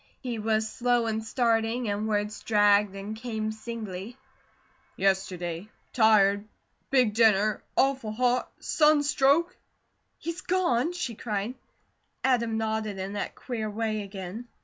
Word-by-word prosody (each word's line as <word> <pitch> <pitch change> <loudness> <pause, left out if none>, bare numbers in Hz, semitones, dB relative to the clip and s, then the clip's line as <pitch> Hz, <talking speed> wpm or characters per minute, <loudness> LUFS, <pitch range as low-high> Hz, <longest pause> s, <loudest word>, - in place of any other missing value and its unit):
He 240 -4 -4
was 220 0 +1
slow 240 +1 +1
in 220 -1 -1
starting 230 0 0
and 205 +1 -1
words 210 0 -1
dragged 205 -2 +3
and 200 +2 -6
came 220 -1 -3
singly: 220 -1 -7 0.8
"Yesterday 185 -1 -1 0.2
tired 210 -3 +4 0.4
big 250 -6 +3
dinner 215 -2 +3 0.2
awful 265 -5 +2
hot 250 +2 +1
sunstroke 300 +1 +3 0.3
" - - -47
"He's 335 -1 -5
gone?" 335 -5 +1
she 265 -9 -3
cried. 215 +1 -3 0.7
Adam 235 -4 +2
nodded 220 -2 -2
in 190 +1 -4
that 205 - -4
queer 225 -4 -4
way 215 0 -2
again. 200 +3 -7
220 Hz, 125 wpm, -27 LUFS, 205-245 Hz, 0.8 s, tired